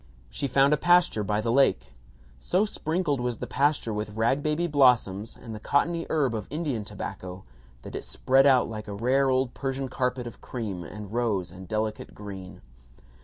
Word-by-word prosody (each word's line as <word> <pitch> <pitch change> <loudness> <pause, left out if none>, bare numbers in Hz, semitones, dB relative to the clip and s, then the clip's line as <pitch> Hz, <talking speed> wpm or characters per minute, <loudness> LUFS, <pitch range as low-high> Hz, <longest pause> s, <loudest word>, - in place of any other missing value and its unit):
She 140 - -2
found 135 +3 +4
a - - +3
pasture 175 -9 +4
by 105 +1 0
the 115 +1 0
lake. 130 - +2 0.5
So 185 - +1
sprinkled 160 -8 -1
was 125 -2 -2
the - - -4
pasture 140 -4 +1
with 105 0 -4
rag 120 +5 +2
baby 155 +3 0
blossoms 125 - +3
and 115 - -8
the 105 - -6
cottony 165 +8 0
herb 140 -6 +1
of 105 -3 -4
Indian 145 -7 -2
tobacco 95 -2 -7 0.4
that - - -9
it - - -4
spread 135 +2 +3
out 130 -2 +5
like 110 -1 -7
a 100 - -5
rare 130 +5 +2
old 130 -1 +1
Persian 135 -1 -3
carpet 125 -1 -1
of 120 - -9
cream 105 -8 -5
and 105 +5 -9
rose 105 -7 0
and 95 +1 -11
delicate 110 +1 -3
green. 95 -3 -9
125 Hz, 180 wpm, -27 LUFS, 105-140 Hz, 0.5 s, out